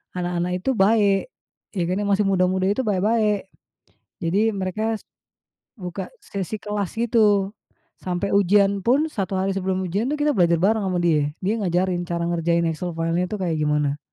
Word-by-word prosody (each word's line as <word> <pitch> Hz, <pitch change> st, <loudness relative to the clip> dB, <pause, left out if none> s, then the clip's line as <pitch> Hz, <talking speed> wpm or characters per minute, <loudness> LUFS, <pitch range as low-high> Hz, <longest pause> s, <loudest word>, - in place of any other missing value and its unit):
anak-anak 180 Hz, 0 st, -1 dB
itu 265 Hz, -, 0 dB
baik, 205 Hz, -, +3 dB, 0.4 s
ya 180 Hz, -, 0 dB
karena 190 Hz, +3 st, -1 dB
masih 200 Hz, 0 st, +2 dB
muda-muda 185 Hz, 0 st, +2 dB
itu 255 Hz, +6 st, 0 dB
baik-baik. 210 Hz, 0 st, +1 dB, 0.8 s
Jadi 200 Hz, +7 st, +2 dB
mereka 215 Hz, +4 st, -2 dB, 0.8 s
buka 180 Hz, 0 st, -6 dB
sesi 200 Hz, +2 st, -4 dB
kelas 210 Hz, -3 st, -2 dB
gitu, 210 Hz, -4 st, +3 dB, 0.5 s
sampai 185 Hz, +2 st, -2 dB
ujian 200 Hz, 0 st, +3 dB
pun, 275 Hz, +6 st, +3 dB
1 195 Hz, -5 st, -3 dB
hari 195 Hz, +1 st, 0 dB
sebelum 190 Hz, 0 st, -1 dB
ujian 200 Hz, +7 st, -1 dB
itu 300 Hz, -, -2 dB
kita 295 Hz, 0 st, +3 dB
belajar 170 Hz, -2 st, +3 dB
bareng 210 Hz, +2 st, +2 dB
sama 180 Hz, -1 st, 0 dB
dia 150 Hz, -4 st, +2 dB
dia 210 Hz, +4 st, +1 dB
ngajarin 180 Hz, -1 st, 0 dB
cara 170 Hz, -1 st, -1 dB
ngerjain 170 Hz, 0 st, +1 dB
Excel 175 Hz, +2 st, -4 dB
file-nya 165 Hz, +2 st, 0 dB
itu 210 Hz, -, -3 dB
kayak 170 Hz, -3 st, 0 dB
gimana. 150 Hz, -1 st, 0 dB
190 Hz, 155 wpm, -23 LUFS, 175-210 Hz, 0.8 s, baik